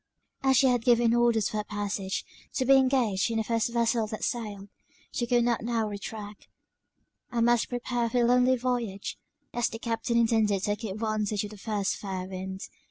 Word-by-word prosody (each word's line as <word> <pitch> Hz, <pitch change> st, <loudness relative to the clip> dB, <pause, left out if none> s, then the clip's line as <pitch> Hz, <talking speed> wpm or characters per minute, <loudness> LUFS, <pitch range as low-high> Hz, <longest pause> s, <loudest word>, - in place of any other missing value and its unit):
As 265 Hz, -1 st, +4 dB
she 270 Hz, -, +5 dB
had 245 Hz, -3 st, +3 dB
given 235 Hz, -1 st, +4 dB
orders 235 Hz, -3 st, +3 dB
for 215 Hz, -, -3 dB
her 210 Hz, -, -1 dB
passage 205 Hz, -1 st, -3 dB, 0.3 s
to 260 Hz, -, 0 dB
be 270 Hz, -, +6 dB
engaged 255 Hz, -7 st, +2 dB
in 225 Hz, -, -1 dB
the 220 Hz, -, +1 dB
first 230 Hz, +1 st, 0 dB
vessel 235 Hz, -1 st, +1 dB
that 215 Hz, 0 st, -6 dB
sailed, 210 Hz, -4 st, -3 dB, 0.4 s
she 240 Hz, -, -2 dB
could 240 Hz, -1 st, +3 dB
not 235 Hz, -1 st, +1 dB
now 230 Hz, -2 st, 0 dB
retract; 205 Hz, 0 st, -7 dB, 0.8 s
and 235 Hz, -1 st, +2 dB
must 240 Hz, -1 st, +3 dB
prepare 245 Hz, -1 st, -1 dB
for 250 Hz, -, -1 dB
the -, -, +4 dB
lonely 250 Hz, +1 st, +4 dB
voyage, 235 Hz, -5 st, -3 dB, 0.3 s
as 240 Hz, -1 st, +1 dB
the 225 Hz, -, -6 dB
Captain 230 Hz, +1 st, -1 dB
intended 220 Hz, -4 st, +2 dB
taking 205 Hz, +1 st, -2 dB
advantage 215 Hz, -1 st, -1 dB
of 210 Hz, -, -6 dB
the -, -, -9 dB
first 205 Hz, -1 st, -2 dB
fair 190 Hz, -2 st, -4 dB
wind. 190 Hz, 0 st, -6 dB
225 Hz, 185 wpm, -28 LUFS, 205-240 Hz, 0.8 s, be